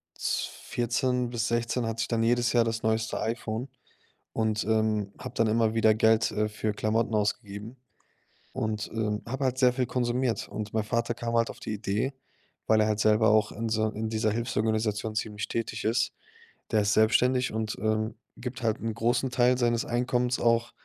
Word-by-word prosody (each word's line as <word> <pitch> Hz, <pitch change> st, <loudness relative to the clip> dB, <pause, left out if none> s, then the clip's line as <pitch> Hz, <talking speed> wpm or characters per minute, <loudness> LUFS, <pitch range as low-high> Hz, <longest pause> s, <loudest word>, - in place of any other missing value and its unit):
2014 125 Hz, +1 st, -1 dB
bis 120 Hz, -2 st, -1 dB
2016 120 Hz, +1 st, 0 dB
hatte 115 Hz, 0 st, -2 dB
ich 115 Hz, -, -1 dB
dann 115 Hz, -1 st, +1 dB
jedes 120 Hz, +1 st, +2 dB
Jahr 120 Hz, -1 st, +4 dB
das 115 Hz, 0 st, -2 dB
neueste 110 Hz, 0 st, 0 dB
iPhone 115 Hz, +2 st, -3 dB, 0.6 s
und, 110 Hz, -1 st, 0 dB
ähm, 110 Hz, -2 st, +1 dB
habe 125 Hz, -1 st, -8 dB
dann 115 Hz, -, +3 dB
immer 110 Hz, 0 st, +2 dB
wieder 110 Hz, -1 st, +5 dB
Geld, 110 Hz, 0 st, +3 dB
äh, 105 Hz, 0 st, 0 dB
für 105 Hz, 0 st, -2 dB
Klamotten 110 Hz, +2 st, 0 dB
ausgegeben. 105 Hz, +2 st, -2 dB, 0.8 s
Und, 110 Hz, -1 st, -2 dB
ähm, 105 Hz, -2 st, -1 dB
habe 135 Hz, +3 st, -3 dB
halt 130 Hz, 0 st, 0 dB
sehr 125 Hz, -1 st, +4 dB
viel 125 Hz, -1 st, 0 dB
konsumiert. 125 Hz, -1 st, 0 dB
Und 105 Hz, 0 st, -5 dB
mein 110 Hz, -1 st, +1 dB
Vater 115 Hz, +2 st, 0 dB
kam 115 Hz, 0 st, -3 dB
halt 115 Hz, 0 st, +2 dB
auf -, -, -9 dB
die 110 Hz, -, -4 dB
Idee, 105 Hz, +6 st, -1 dB, 0.5 s
weil 110 Hz, -1 st, +4 dB
er 105 Hz, -, +3 dB
halt 105 Hz, -1 st, 0 dB
selber 110 Hz, +1 st, +4 dB
auch 105 Hz, -1 st, +3 dB
in 115 Hz, +1 st, -3 dB
so 110 Hz, 0 st, +1 dB
in 110 Hz, +1 st, -4 dB
dieser 110 Hz, -1 st, 0 dB
Hilfsorganisation 110 Hz, -2 st, -1 dB
ziemlich 105 Hz, -2 st, -3 dB
tätig 115 Hz, -1 st, -3 dB
ist. 115 Hz, +1 st, +1 dB, 0.6 s
Der 110 Hz, -, +4 dB
ist 105 Hz, +1 st, +2 dB
selbstständig 125 Hz, +4 st, +3 dB
und, 110 Hz, -1 st, -2 dB
ähm, 110 Hz, 0 st, 0 dB, 0.2 s
gibt 125 Hz, 0 st, -6 dB
halt 110 Hz, -2 st, +1 dB
'n 115 Hz, -1 st, -3 dB
großen 120 Hz, +4 st, +1 dB
Teil 125 Hz, 0 st, +3 dB
seines 120 Hz, -2 st, +1 dB
Einkommens 125 Hz, 0 st, 0 dB
auch 115 Hz, 0 st, +2 dB
115 Hz, 180 wpm, -28 LUFS, 110-120 Hz, 0.8 s, wieder